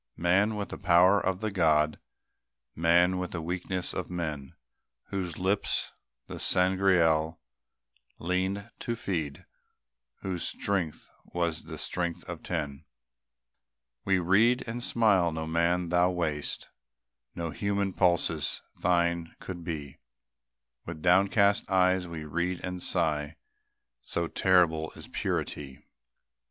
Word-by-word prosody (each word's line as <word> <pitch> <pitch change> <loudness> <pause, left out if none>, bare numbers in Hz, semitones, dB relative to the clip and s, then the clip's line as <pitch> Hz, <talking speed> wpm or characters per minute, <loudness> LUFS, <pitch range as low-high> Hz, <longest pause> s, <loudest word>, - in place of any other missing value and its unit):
Man 95 +6 +2
with 105 -1 -4
the - - -7
power 90 +3 +5
of 95 0 -1
the 110 -1 -1
God, 80 -4 +2 0.8
Man 90 +3 +3
with 90 - -3
the 90 - -4
weaknesses 90 +2 -3
of 90 - -4
men, 80 -6 -4 0.5
Whose 90 -4 -3
lips 95 +2 0 0.3
the - - -8
Sangreal 90 -4 +3 0.8
leaned 95 +5 -2
to 120 - -2
feed, 80 -10 -4 0.8
"Whose 90 -3 -3
strength 90 -6 -2 0.2
was 85 -2 -2
the - - -7
strength 85 -2 -2
of - - -6
ten," 70 +1 -4 1.2
We 95 -1 +2
read 105 +8 +3
and 120 +2 -4
smile; 100 -9 +3
no 80 0 -4
man 85 +2 +1
thou 90 +1 +3
wast; 80 -5 -2 0.7
No 85 -2 -3
human 100 +2 -1
pulses 85 -4 +1
thine 85 -1 0
could 90 -2 -7
be; 75 -4 -6 0.8
With 80 -2 -8
downcast 100 +3 +4
eyes 90 -1 +3
we 80 -2 -6
read 85 +4 -2
and 90 0 -5
sigh; 80 -4 +1 0.7
So 85 +6 -2
terrible 85 -4 +2
is - - -10
purity! 70 -3 -3
90 Hz, 120 wpm, -29 LUFS, 80-95 Hz, 1.2 s, power